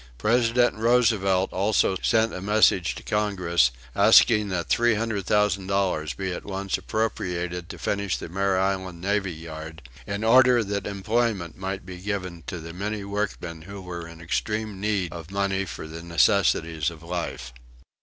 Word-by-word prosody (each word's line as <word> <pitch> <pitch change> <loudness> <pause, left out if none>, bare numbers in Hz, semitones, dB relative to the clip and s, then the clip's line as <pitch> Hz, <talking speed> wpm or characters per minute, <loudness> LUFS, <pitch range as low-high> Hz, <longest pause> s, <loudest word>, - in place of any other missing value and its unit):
President 120 - +2
Roosevelt 110 -5 +2
also 100 0 +2
sent 115 -1 +2
a 90 - -5
message 100 -3 +3
to - - -9
Congress 90 -9 +2 0.3
asking 105 -2 +6
that 90 -2 -2
$300,000 100 -7 +1
be 95 -2 -2
at - - -6
once 100 -1 -3
appropriated 90 -5 -3
to 90 - -7
finish 100 +3 -1
the - - -7
Mare 95 +2 0
Island 95 -2 -1
Navy 100 +1 0
Yard, 80 -1 -9 0.2
in 100 +1 -3
order 125 +1 +6
that 100 -1 -3
employment 100 -3 -1
might 95 0 -5
be 90 -1 -8
given 90 -3 -4
to 90 - -4
the 85 +1 -8
many 100 +3 -3
workmen 100 -5 -4
who 100 +4 -9
were 85 -2 -7
in 85 0 -12
extreme 105 +4 -2
need 100 -5 -1
of 85 -2 -8
money 100 0 -1
for 85 - -7
the 80 +1 -8
necessities 85 -3 +2
of 85 -1 -12
life. 85 -8 -5
95 Hz, 150 wpm, -25 LUFS, 85-105 Hz, 0.3 s, asking